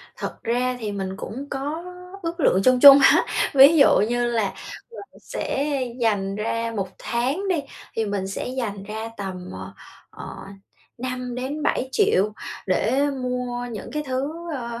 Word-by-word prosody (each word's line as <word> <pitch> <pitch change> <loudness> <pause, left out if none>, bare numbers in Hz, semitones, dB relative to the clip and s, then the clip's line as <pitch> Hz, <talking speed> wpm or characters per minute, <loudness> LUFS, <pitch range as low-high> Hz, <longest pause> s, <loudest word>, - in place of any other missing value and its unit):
Thật - - -7
ra 250 +2 0
thì 215 -3 -3
mình 190 -1 -4
cũng 265 +7 -7
có 290 +5 -4 0.4
ước 335 +1 -4
lượng 195 - +3
chung 255 +2 +4
chung 280 +1 +11
á. 275 - +5 0.3
Ví 280 +4 +8
dụ 275 - +6
như 240 +3 +1
là 230 -4 0 0.4
mình 465 -4 -12
sẽ 285 +1 -2 0.2
dành 200 -4 +1
ra 230 +2 -2
1 195 -2 -2
tháng 270 +12 -1
đi 340 -6 +1 0.3
thì 225 - +1
mình 200 -2 -2
sẽ 195 - -4
dành 230 -6 -4
ra 220 +2 -5
tầm, 185 -2 -6
ờ, 95 +1 -8 0.4
ờ, - - -9 0.6
5-7 255 +2 -2
triệu 215 - +2 0.3
để 250 +9 +2 0.2
mua 250 -1 -3
những 215 -3 -7
cái 300 - -2
thứ, 260 +3 -2 0.2
ơ, 235 -3 -5
245 Hz, 155 wpm, -23 LUFS, 210-275 Hz, 0.6 s, chung